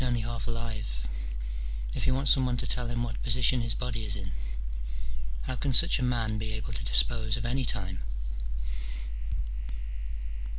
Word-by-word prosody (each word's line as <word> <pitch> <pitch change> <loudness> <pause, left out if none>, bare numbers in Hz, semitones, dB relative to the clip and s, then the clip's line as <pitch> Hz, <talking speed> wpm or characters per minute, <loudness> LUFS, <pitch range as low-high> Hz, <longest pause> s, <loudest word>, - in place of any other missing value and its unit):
307 125 -2 +2
only 120 +1 -2
half 115 - -3
alive, 110 - -2 0.9
if - - 0
he - - +4
wants 135 +1 +7
some 135 - +6
one 125 -1 +1
to 125 - +3
tell 125 0 +1
him 120 0 0
what 120 -1 -3
position 125 +1 +5
his 115 -2 +1
body 120 -3 -2
is 105 -2 +2
in. 95 -2 -3 1.1
How 130 - -1
can 135 +2 0
snch - - +6
a - - -1
man 115 -3 +1
be 110 0 -2
able 110 0 -4
to - - -1
dispose 110 - +4
of 115 - -3
any 130 +2 +1
time 95 -5 0
115 Hz, 170 wpm, -30 LUFS, 110-125 Hz, 1.1 s, wants